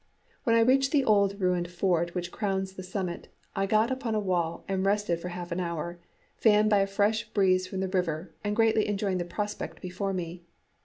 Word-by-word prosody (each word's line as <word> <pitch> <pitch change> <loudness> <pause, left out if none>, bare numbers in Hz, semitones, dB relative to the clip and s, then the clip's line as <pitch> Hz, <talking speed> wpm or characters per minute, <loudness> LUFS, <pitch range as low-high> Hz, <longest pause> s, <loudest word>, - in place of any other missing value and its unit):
When 230 -2 +4
I 230 - +5
reached 270 +3 +4
the 280 -4 +3
old 200 -1 +3
ruined 180 -2 +1
fort 175 -1 0
which 175 0 -3
crowns 190 -2 -2
the 190 - -7
summit, 185 -1 -4 0.3
I 195 0 0
got 215 +4 +3
upon 255 -4 -2
a - - +2
wall 175 -4 -1
and 190 -1 -1
rested 200 -4 +1
for 180 - -6
half 175 0 -6
an 170 - -1
hour, 170 0 -3 0.4
fanned 215 -1 +4
by 205 - +5
a 195 - +2
fresh 210 +3 +1
breeze 185 -3 +2
from 190 0 -4
the 190 - 0
river 175 -3 -2
and 205 0 -1
greatly 225 -1 +3
enjoying 195 -2 0
the 175 - -2
prospect 205 +4 -4
before 190 +2 -3
me. 175 -2 -4
190 Hz, 205 wpm, -28 LUFS, 180-210 Hz, 0.4 s, I